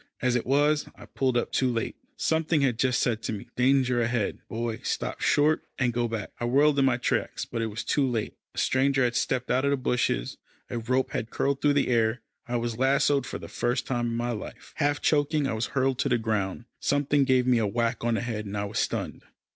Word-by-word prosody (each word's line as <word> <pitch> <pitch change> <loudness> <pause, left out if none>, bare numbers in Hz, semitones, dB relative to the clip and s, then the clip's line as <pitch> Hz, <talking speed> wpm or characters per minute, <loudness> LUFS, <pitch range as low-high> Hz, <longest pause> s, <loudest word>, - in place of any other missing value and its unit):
As 125 -1 +1
it 120 - -1
was, 145 +2 +2
I - - -12
pulled 130 -2 0
up 120 - -1
too 130 -2 +1
late. 115 -1 -2 0.2
Something 160 -1 +1
had 125 -4 +1
just 125 -1 +2
said 115 -3 0
to - - -3
me, 100 - -7
"Danger 125 -1 +3
ahead, 115 -3 -1
Boy: 115 0 -3
stop - - -3
short, 150 +2 +3
and 125 -2 +1
go 120 0 0
back." 115 -2 -4
I 120 - -1
whirled 140 +4 +4
in 135 - +4
my 130 -2 +3
tracks, - - -1
but 115 - -4
it 115 - 0
was 110 +1 -5
too 140 -3 +1
late. 115 -3 -2 0.2
A - - -16
stranger 135 0 +2
had 120 -1 +1
stepped 125 0 0
out 130 +2 +2
of 140 - +2
the 140 - +2
bushes, 125 - -1 0.3
a 120 - -2
rope 130 +3 0
had 115 - -3
curled 140 +2 -1
through 145 -1 +4
the 140 -2 +1
air 115 -1 +2 0.3
I 120 - -2
was 120 -1 -2
lassoed 135 0 +2
for - - -4
the - - -9
first 120 +1 -1
time 120 -2 -1
in 115 - -2
my 120 +1 -1
life. 110 -3 -7
Half 145 -1 +1
choking, 150 0 +2
I 135 - -1
was 110 +1 -1
hurled 130 0 +1
to 140 - +1
the 120 - +3
ground. 110 -1 -2
Something 145 0 +2
gave 130 -2 +3
me 125 -2 +3
a 110 - +1
whack 115 +3 -1
on 120 -1 +1
the - - -1
head, 110 -3 -4
and 100 +1 -4
I 100 - -1
was 100 - -3
stunned. - - -2
125 Hz, 235 wpm, -27 LUFS, 115-135 Hz, 0.3 s, whirled